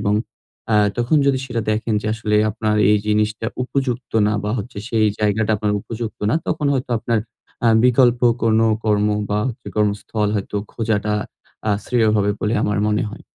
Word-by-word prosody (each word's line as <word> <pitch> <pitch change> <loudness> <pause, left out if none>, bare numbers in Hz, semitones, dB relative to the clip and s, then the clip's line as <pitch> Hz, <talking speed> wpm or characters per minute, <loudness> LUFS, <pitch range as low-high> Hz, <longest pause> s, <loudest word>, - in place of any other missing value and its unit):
এবং 100 0 +1 0.6
আ - - +4 0.2
তখন 120 +6 +2
যদি 135 -1 +3
সেটা 120 -2 -2
দেখেন 110 +1 -1
যে, - - -4
আসলে 105 -1 0
আপনার 105 0 -1
এই 105 - +4
জিনিসটা 105 +1 0 0.2
উপযুক্ত 130 -2 -3
না, 105 - +1
বা 105 - -1
হচ্ছে, 120 -4 -6
সেই 110 -2 +2
জায়গাটা 105 +1 +1
আপনার 105 0 -1
উপযুক্ত 115 +1 -6
না, - - +2
তখন 150 -2 0
হয়তো 130 -1 -3
আপনার 115 0 0 0.5
আ - - +6 0.2
বিকল্প 125 -1 +4 0.2
কোনো 115 0 +3 0.2
কর্ম 105 -1 +2 0.2
বা 105 - +1
হচ্ছে 115 - -8
কর্মস্থল 105 0 0
হয়তো 100 +1 -4 0.2
খোঁজাটা 105 -2 -1 0.6
আ - - +3
শ্রেয় 115 -3 +2
হবে 105 0 +2
বলে 110 +2 0
আমার 105 0 0
মনে 105 0 +1
হয়। - - -11
110 Hz, 175 wpm, -20 LUFS, 105-120 Hz, 0.6 s, আ